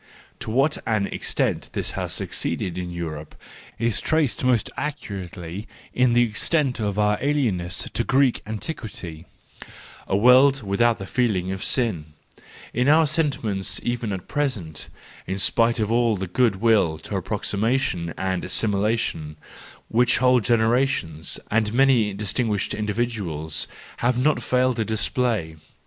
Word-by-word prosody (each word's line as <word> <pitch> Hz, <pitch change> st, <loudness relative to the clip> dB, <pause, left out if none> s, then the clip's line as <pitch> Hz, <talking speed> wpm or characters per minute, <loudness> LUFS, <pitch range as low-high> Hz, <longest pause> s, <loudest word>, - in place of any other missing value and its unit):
To -, -, -4 dB
what 135 Hz, +7 st, +2 dB
an 110 Hz, -3 st, +1 dB
extent -, -, -1 dB
this -, -, -2 dB
has -, -, -4 dB
suc¬ -, -, -2 dB
ceeded 90 Hz, -, -2 dB
in 90 Hz, -1 st, -4 dB
Europe 80 Hz, -3 st, -6 dB, 0.4 s
is 115 Hz, -1 st, 0 dB
traced 155 Hz, -6 st, +1 dB
most 125 Hz, -4 st, +2 dB
accurately 95 Hz, -, -5 dB, 0.3 s
in 125 Hz, -1 st, +3 dB
the 120 Hz, 0 st, +5 dB
extent 125 Hz, +5 st, 0 dB
of 105 Hz, -2 st, -1 dB
our 105 Hz, 0 st, +2 dB
alienness 115 Hz, -12 st, 0 dB
to 120 Hz, -, 0 dB
Greek 135 Hz, 0 st, +2 dB
antiquity—a 100 Hz, -, -7 dB
world 130 Hz, +4 st, +6 dB
without 110 Hz, +4 st, +2 dB
the 95 Hz, -, -6 dB
feeling 95 Hz, -5 st, 0 dB
of 95 Hz, 0 st, -4 dB
sin—in 110 Hz, -, -3 dB
our 160 Hz, +2 st, +6 dB
sentiments 130 Hz, -, -1 dB
even 120 Hz, -3 st, -2 dB
at 95 Hz, -2 st, -5 dB
present; 115 Hz, -, -3 dB, 0.4 s
in 95 Hz, -, -2 dB
spite 115 Hz, +4 st, +3 dB
of 110 Hz, 0 st, 0 dB
all 115 Hz, -2 st, +2 dB
the 95 Hz, -, -3 dB
good 115 Hz, +3 st, +2 dB
will 100 Hz, -6 st, +3 dB
to -, -, -12 dB
approxi¬ 100 Hz, -, -2 dB
mation 110 Hz, -8 st, 0 dB
and 95 Hz, -1 st, -1 dB
assimilation, 100 Hz, -7 st, -1 dB, 0.5 s
which 120 Hz, +1 st, +3 dB
whole 125 Hz, 0 st, +4 dB
generations 115 Hz, -, +1 dB
and 110 Hz, 0 st, +1 dB
many 125 Hz, -5 st, +4 dB
distinguished 105 Hz, +1 st, -1 dB
individuals 105 Hz, -8 st, -2 dB, 0.3 s
have 120 Hz, +1 st, +1 dB
not 150 Hz, +5 st, +2 dB
failed 125 Hz, -1 st, +1 dB
to 110 Hz, -, +1 dB
display. 110 Hz, -5 st, -1 dB
110 Hz, 135 wpm, -23 LUFS, 95-125 Hz, 0.5 s, world